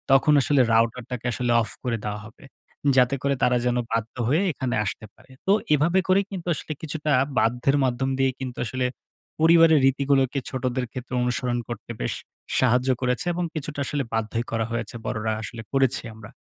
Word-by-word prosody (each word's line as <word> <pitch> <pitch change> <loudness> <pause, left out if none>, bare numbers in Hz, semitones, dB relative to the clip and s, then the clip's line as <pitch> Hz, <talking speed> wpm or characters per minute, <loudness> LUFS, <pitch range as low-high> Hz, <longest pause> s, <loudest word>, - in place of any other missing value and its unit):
তখন 150 +3 +4
আসলে 145 -3 +3
রাউটারটাকে 115 +1 0
আসলে 120 0 -1
অফ 110 - -3
করে 120 -3 -1
দেওয়া 105 0 -3
হবে। 110 +4 -15 0.5
যাতে 125 +1 +4
করে 140 0 +2
তারা 125 0 +4
যেন 125 0 +1 0.2
বাধ্য 115 0 -2
হয়ে 150 +9 +3
এখানে 130 -4 -2
আসতে 110 - -4
পারে। 130 - -21 0.2
তো - - +5 0.2
এভাবে 165 +6 +3
করে 185 +1 +5
কিন্তু 180 -3 -6
আসলে 155 - -5
কিছুটা 155 -1 -3 0.3
বাধ্যের 125 +4 +2
মাধ্যম 130 +1 0
দিয়ে 135 -1 +3
কিন্তু 130 -2 -6
আসলে, 125 +2 -2 0.5
পরিবারের 165 -1 +6
রীতিগুলোকে 135 0 +2
ছোটদের 130 -1 -2
ক্ষেত্রে 125 0 -7
অনুসরণ 125 0 -1
করতে 120 0 -6
বেশ - - -1 0.5
সাহায্য 125 +1 +3
করেছে, 125 -2 0
এবং 175 +1 -2
কিছুটা 150 -1 -4
আসলে 145 -2 -1
বাধ্যই 115 +1 -1
করা 115 -1 0
হয়েছে। 115 -1 -3
বড়রা 110 0 -2
আসলে 110 +2 -7
করেছি 135 -1 +2
আমরা। 110 -1 -11
125 Hz, 170 wpm, -24 LUFS, 115-140 Hz, 0.5 s, পরিবারের